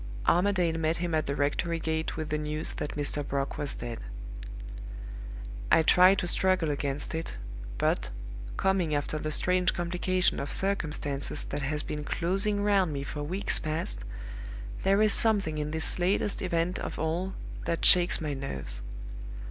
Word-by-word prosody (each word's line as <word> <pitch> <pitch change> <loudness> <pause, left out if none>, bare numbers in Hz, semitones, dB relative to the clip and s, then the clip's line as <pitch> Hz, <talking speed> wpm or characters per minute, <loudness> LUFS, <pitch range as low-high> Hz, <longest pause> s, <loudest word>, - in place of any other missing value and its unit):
Armadale 175 -3 +2
met 160 +1 0
him 175 -1 -3
at 155 -1 0
the 140 - -2
rectory 165 +4 -1
gate 160 0 -2
with 155 -1 -4
the 150 - 0
news 150 +1 -3
that 150 - -5
Mr. 145 0 -1
Brock 140 0 -3
was 145 -1 -4
dead. 120 -1 -6 1.7
"I 160 - +6
try 180 +4 +6
to 180 - -2
struggle 185 -3 +1
against 140 +1 -3
it, 160 - -5 0.4
but, - - 0 0.5
coming 185 -5 +1
after 145 +1 -2
the 155 0 -3
strange 180 +3 +1
complication 180 +1 0
of 140 - -4
circumstances 150 -7 0
that - - -4
has 150 +2 -1
been 150 0 -5
closing 195 +6 +2
round 195 -5 +2
me 140 -1 -4
for 145 +1 -6
weeks 180 +7 +2
past, 155 - -3 0.8
there 195 +2 +3
is 215 - +4
something 200 -9 +3
in 150 0 -2
this 160 +3 -1
latest 195 +3 0
event 175 0 -1
of - - -5
all 170 +4 -2 0.3
that 165 - -1
shakes 180 0 +8
my 150 -2 -3
nerves. 70 - -4
160 Hz, 155 wpm, -28 LUFS, 150-185 Hz, 1.7 s, shakes